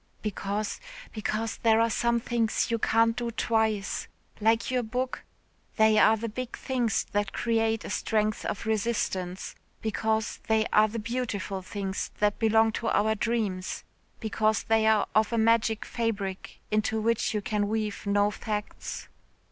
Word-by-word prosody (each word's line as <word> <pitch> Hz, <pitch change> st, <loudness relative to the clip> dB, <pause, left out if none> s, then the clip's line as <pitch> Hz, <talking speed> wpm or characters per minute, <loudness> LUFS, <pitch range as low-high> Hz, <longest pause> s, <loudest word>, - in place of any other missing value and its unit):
"Because 205 Hz, 0 st, -2 dB, 0.3 s
because 220 Hz, +1 st, -2 dB
there 225 Hz, -1 st, +4 dB
are 230 Hz, 0 st, +3 dB
some 235 Hz, +1 st, +2 dB
things 230 Hz, -1 st, 0 dB
you 230 Hz, -, +1 dB
can't 230 Hz, +1 st, +3 dB
do 240 Hz, -1 st, -2 dB
twice 220 Hz, -3 st, 0 dB, 0.3 s
like 225 Hz, +3 st, +2 dB
your 250 Hz, -1 st, +2 dB
book, 250 Hz, +3 st, -3 dB, 0.5 s
they 220 Hz, -1 st, +5 dB
are 220 Hz, +1 st, +6 dB
the 230 Hz, +2 st, -3 dB
big 245 Hz, +3 st, -5 dB
things 245 Hz, -5 st, 0 dB
that 205 Hz, 0 st, -1 dB
create 225 Hz, -1 st, 0 dB
a -, -, -5 dB
strength 215 Hz, 0 st, 0 dB
of 205 Hz, -, -3 dB
resistance. 200 Hz, -4 st, -1 dB, 0.3 s
Because 220 Hz, 0 st, -1 dB
they 220 Hz, -1 st, +3 dB
are 215 Hz, 0 st, +6 dB
the 220 Hz, +2 st, -5 dB
beautiful 215 Hz, -4 st, -3 dB
things 190 Hz, +1 st, -4 dB
that 205 Hz, -1 st, +1 dB
belong 225 Hz, 0 st, +4 dB
to 225 Hz, -, -3 dB
our 220 Hz, +1 st, +3 dB
dreams. 210 Hz, -4 st, -2 dB, 0.4 s
Because 215 Hz, -1 st, +1 dB
they 220 Hz, 0 st, +3 dB
are 220 Hz, -2 st, +4 dB
of 215 Hz, 0 st, +3 dB
a 230 Hz, -, 0 dB
magic 225 Hz, -1 st, +2 dB
fabric, 205 Hz, -5 st, -3 dB
into 215 Hz, +1 st, +1 dB
which 225 Hz, 0 st, +1 dB
you 210 Hz, -, 0 dB
can 205 Hz, 0 st, 0 dB
weave 215 Hz, -1 st, -2 dB
no 205 Hz, 0 st, +3 dB
facts." 210 Hz, 0 st, -5 dB
220 Hz, 150 wpm, -28 LUFS, 210-230 Hz, 0.5 s, are